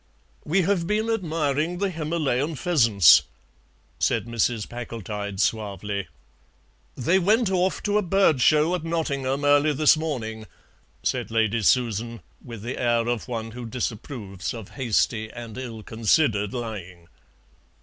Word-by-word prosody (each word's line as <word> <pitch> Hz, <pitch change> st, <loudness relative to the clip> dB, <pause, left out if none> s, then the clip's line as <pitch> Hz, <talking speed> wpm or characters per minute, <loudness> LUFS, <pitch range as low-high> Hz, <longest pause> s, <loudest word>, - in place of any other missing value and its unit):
"We 180 Hz, +5 st, +1 dB
have 175 Hz, -2 st, 0 dB
been 215 Hz, +3 st, 0 dB
admiring 165 Hz, -4 st, -1 dB
the 195 Hz, +1 st, -1 dB
Himalayan 155 Hz, -3 st, -1 dB
pheasants," 115 Hz, -, +5 dB, 0.8 s
said -, -, +1 dB
Mrs. 115 Hz, -1 st, -1 dB
Packletide 105 Hz, -4 st, -6 dB
suavely. 100 Hz, -2 st, -1 dB, 0.9 s
"They 170 Hz, +10 st, +2 dB
went 210 Hz, +3 st, +2 dB
off 185 Hz, 0 st, 0 dB
to 205 Hz, 0 st, +2 dB
a -, -, +1 dB
bird 185 Hz, -7 st, +2 dB
show 155 Hz, +5 st, +4 dB
at 180 Hz, -, -2 dB
Nottingham 140 Hz, -4 st, -1 dB
early 145 Hz, +1 st, +4 dB
this 150 Hz, +2 st, +5 dB
morning," 115 Hz, -9 st, -4 dB, 0.6 s
said -, -, -1 dB
Lady 115 Hz, 0 st, +1 dB
Susan, 115 Hz, 0 st, +1 dB, 0.2 s
with 115 Hz, -5 st, -9 dB
the 120 Hz, +3 st, -4 dB
air 120 Hz, -1 st, +1 dB
of 120 Hz, -2 st, -2 dB
one 115 Hz, -2 st, -4 dB
who 120 Hz, +1 st, -7 dB
disapproves 110 Hz, -4 st, -5 dB
of 110 Hz, -4 st, -9 dB
hasty 115 Hz, -3 st, 0 dB
and 115 Hz, -2 st, -9 dB
ill 120 Hz, -4 st, -7 dB
considered 110 Hz, -2 st, +1 dB
lying. 95 Hz, -8 st, -7 dB
125 Hz, 130 wpm, -24 LUFS, 110-160 Hz, 0.9 s, pheasants